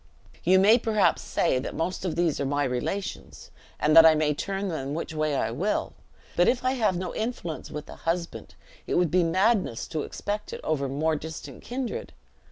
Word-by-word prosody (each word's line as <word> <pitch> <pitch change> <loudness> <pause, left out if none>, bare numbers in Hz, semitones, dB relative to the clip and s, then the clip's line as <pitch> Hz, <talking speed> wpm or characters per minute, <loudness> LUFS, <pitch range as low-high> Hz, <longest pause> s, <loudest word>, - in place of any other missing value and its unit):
You 185 +2 +5
may 210 +5 +6
perhaps 215 -3 +2
say, 150 -7 +1
that 130 - -5
most 180 +4 -2
of 175 - -1
these 170 -3 +1
are - - 0
my 145 +1 0
relations, 140 +10 -4 0.3
and 155 +1 +3
that 165 - +11
I 160 -1 +7
may 155 -1 +2
turn 195 +6 -3
them 145 -5 -3
which 165 0 -4
way 155 -2 0
I - - 0
will; - - -1 0.4
but 175 - +4
if 250 0 +1
I 255 - +3
have 220 -8 +1
no 180 -1 -4
influence 220 -8 -4
with 150 0 -7
a - - -10
husband, 170 +1 -3 0.3
it - - -1
would 175 -3 +2
be 180 0 +4
madness 185 - +1
to 155 - -2
expect 210 +6 -4
it - - -6
over 140 -3 -1
more 155 +4 0
distant 160 +2 -8
kindred. 250 0 -5
170 Hz, 195 wpm, -26 LUFS, 155-195 Hz, 0.4 s, that